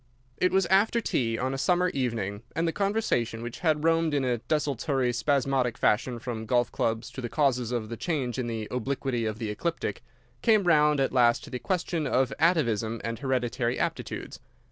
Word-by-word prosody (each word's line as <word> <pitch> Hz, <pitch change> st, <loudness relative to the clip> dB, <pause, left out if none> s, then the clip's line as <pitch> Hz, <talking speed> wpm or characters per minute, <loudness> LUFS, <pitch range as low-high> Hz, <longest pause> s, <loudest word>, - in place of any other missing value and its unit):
It 180 Hz, -, +2 dB
was 190 Hz, -1 st, +3 dB
after 195 Hz, +6 st, +3 dB
tea 115 Hz, -, 0 dB
on 130 Hz, +3 st, -1 dB
a 135 Hz, -, -3 dB
summer 180 Hz, +4 st, +2 dB
evening, 115 Hz, -, -2 dB
and 165 Hz, +1 st, +1 dB
the -, -, +1 dB
conversation, 180 Hz, -, 0 dB
which 120 Hz, 0 st, -6 dB
had 155 Hz, -3 st, +1 dB
roamed 165 Hz, -2 st, +2 dB
in 135 Hz, -2 st, +1 dB
a 120 Hz, -2 st, 0 dB
desultory, 135 Hz, -1 st, 0 dB
spasmodic 130 Hz, -2 st, +1 dB
fashion 120 Hz, +3 st, +1 dB
from 115 Hz, -2 st, -5 dB
golf 120 Hz, 0 st, +2 dB
clubs 115 Hz, +2 st, -1 dB
to 130 Hz, -, -7 dB
the 120 Hz, -, -4 dB
causes 125 Hz, -5 st, +1 dB
of 115 Hz, -3 st, -2 dB
the 115 Hz, -, -5 dB
change 135 Hz, -7 st, -2 dB
in 125 Hz, -, -2 dB
the 110 Hz, -2 st, -3 dB
obliquity 125 Hz, -1 st, -2 dB
of 110 Hz, -1 st, -2 dB
the 110 Hz, -2 st, -3 dB
ecliptic, 165 Hz, +10 st, -3 dB, 0.4 s
came 215 Hz, -3 st, +4 dB
round 150 Hz, -4 st, +4 dB
at 135 Hz, -, +1 dB
last 120 Hz, -2 st, +4 dB
to 145 Hz, -, -11 dB
the 125 Hz, -, -3 dB
question 170 Hz, -3 st, -1 dB
of 130 Hz, -1 st, +1 dB
atavism 115 Hz, -, +2 dB
and 115 Hz, -1 st, -3 dB
hereditary 125 Hz, -2 st, -1 dB
aptitudes. -, -, -4 dB
130 Hz, 190 wpm, -27 LUFS, 115-155 Hz, 0.4 s, came